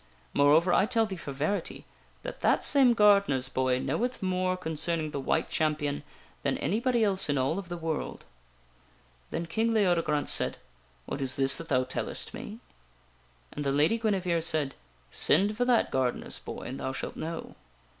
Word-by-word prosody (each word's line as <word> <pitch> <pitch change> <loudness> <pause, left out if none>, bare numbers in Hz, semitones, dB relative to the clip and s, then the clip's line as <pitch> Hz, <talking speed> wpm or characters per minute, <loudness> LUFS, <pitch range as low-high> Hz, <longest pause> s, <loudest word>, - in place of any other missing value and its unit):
Moreover, 155 +5 +4
I 200 - +4
tell 230 -2 +2
thee 195 -3 -5
for 165 -5 -7
verity 155 +7 -2 0.4
that - - -7
that - - +3
same 265 -5 +5
gardener's 200 - +4
boy 130 0 +1
knoweth 200 - -2
more 185 0 0
concerning 160 -2 -1
the 140 - -3
White 160 +4 0
Champion 150 -2 -1 0.4
than 140 - 0
anybody 235 +3 +1
else 195 -5 +1
in 145 - +1
all 135 +8 0
of 185 -3 -9
the 175 - -4
world." 160 -2 -4 1.0
Then 170 - -3
King 220 +7 0
Leodegrance 170 -7 +1
said: - - -1 0.2
" 65 +1 -34
What 140 - -5
is 130 -1 +1
this 135 -1 +4
that 165 - -9
thou 130 -3 +3
tellestme?" - - -5 0.9
And 145 - -4
the 140 - 0
Lady 155 +11 +2
Guinevere 185 -6 0
said: 155 -4 0 0.2
" - - -33 0.2
Send 200 +8 +4
for 245 +3 0
that 245 -2 +2
gardener's 130 -2 -1
boy - - -7
and 130 - -6
thou 130 - -3
shalt - - -5
know." 165 +1 -6
165 Hz, 170 wpm, -28 LUFS, 140-200 Hz, 1.0 s, same